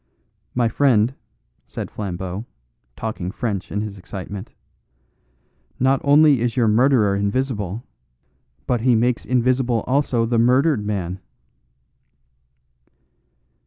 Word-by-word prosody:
"My 120 -1 +2
friend," 120 -1 +2 0.5
said - - -6
Flambeau, 95 +1 -5 0.5
talking 105 -5 -4
French 100 -2 -4
in 105 - -1
his 105 -2 -6
excitement, 95 +2 -7 1.3
"not 130 +1 +2
only 145 -2 +5
is 120 0 -1
your 120 -3 +3
murderer 110 -2 +3
invisible, 105 0 -2 0.8
but 120 -2 0
he 125 0 +4
makes 120 +1 +1
invisible 125 -1 +1
also 130 -3 +1
the 115 0 +1
murdered 130 +1 +3
man." 95 -3 -3
115 Hz, 100 wpm, -21 LUFS, 100-130 Hz, 1.3 s, only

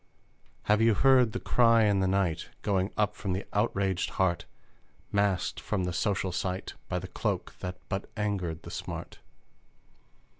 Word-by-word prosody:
Have 105 +1 +3
you 115 -1 +5
heard 130 -1 +5
the - - -3
cry 115 -2 +4
in 100 -2 +3
the 95 - +2
night 95 -4 0
Going 95 -2 +1
up 105 -1 +1
from 100 -3 -2
the 95 +2 -3
outraged 95 -2 +1
heart, 90 -3 +1 0.7
Masked 100 -2 +1
from 100 -3 -2
the 90 -1 -2
social 95 0 0
sight 90 +1 -3 0.2
By 90 - 0
the 90 +1 -5
cloak 90 - -2
that 90 0 -5
but 100 -1 -3
angered 95 -6 -2
the - - -8
smart? - - -6
95 Hz, 155 wpm, -29 LUFS, 90-105 Hz, 0.7 s, you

